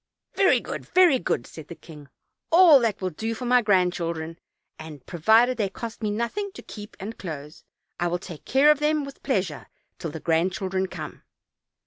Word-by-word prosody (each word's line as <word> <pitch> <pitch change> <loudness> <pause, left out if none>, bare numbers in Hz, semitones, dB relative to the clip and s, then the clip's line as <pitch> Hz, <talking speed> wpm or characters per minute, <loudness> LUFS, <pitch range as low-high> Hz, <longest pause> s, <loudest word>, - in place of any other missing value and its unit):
"Very 390 0 +4
good, - - -7
very 355 -7 +5
good," 125 -8 -2
said 160 - -11
the 170 - -9
king, 150 -3 -14 0.4
"all 335 -4 +8
that 230 -5 -1
will 185 -1 -2
do 225 +8 -4
for 250 - -6
my 250 0 +4
grandchildren, 170 -5 0 0.4
and 155 -4 -10
provided 225 +9 +3
they 200 -3 0
cost 230 +4 -8
me 215 - -1
nothing 235 - -3
to - - -11
keep 210 0 -11
and 215 +4 -7
clothe, 150 -4 -7 0.5
I 175 - +1
will 175 +1 -1
take 175 -3 -10
care 280 +3 +4
of 300 - +1
them 300 -1 +1
with 275 - -11
pleasure 185 - -2 0.3
till 165 - -4
the 160 - -7
grandchildren 185 +4 0
come." - - -8
195 Hz, 180 wpm, -25 LUFS, 165-250 Hz, 0.5 s, all